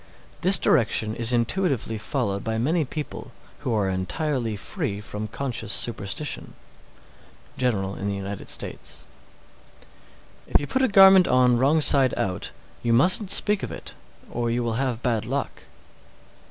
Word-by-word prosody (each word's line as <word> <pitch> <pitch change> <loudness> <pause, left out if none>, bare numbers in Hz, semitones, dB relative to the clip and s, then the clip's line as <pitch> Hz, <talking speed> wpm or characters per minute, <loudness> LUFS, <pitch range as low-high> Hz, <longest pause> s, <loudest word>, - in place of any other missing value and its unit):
This 190 +2 +7
direction 110 -2 +1
is 115 0 0
intuitively 120 - -1
followed 110 -4 -3
by 110 0 -2
many 155 +7 +1
people 150 +3 -7 0.3
who 125 - -4
are 100 -2 0
entirely 110 - -2
free 110 - -4
from 105 0 -6
conscious 120 -4 -4
superstition. 120 +5 -3 1.0
General 100 -7 -1
in 100 +1 -4
the 100 - -2
United 100 0 -6
States. - - -4 1.4
623. - - -15
If - - +7
you 145 - -4
put 260 - -1
a 260 - +3
garment 195 -2 +7
on 125 -1 +3
wrong 145 +5 +3
side 135 -4 +4
out, 90 -2 -3 0.3
you 120 -1 0
mustn't 180 - +2
speak 205 0 +6
of - - -5
it, - - -7 0.4
or 120 0 -2
you 120 +1 -1
will 115 -1 -2
have 125 -3 -3
bad 115 -4 -1
luck. - - -4
120 Hz, 150 wpm, -24 LUFS, 110-150 Hz, 1.4 s, This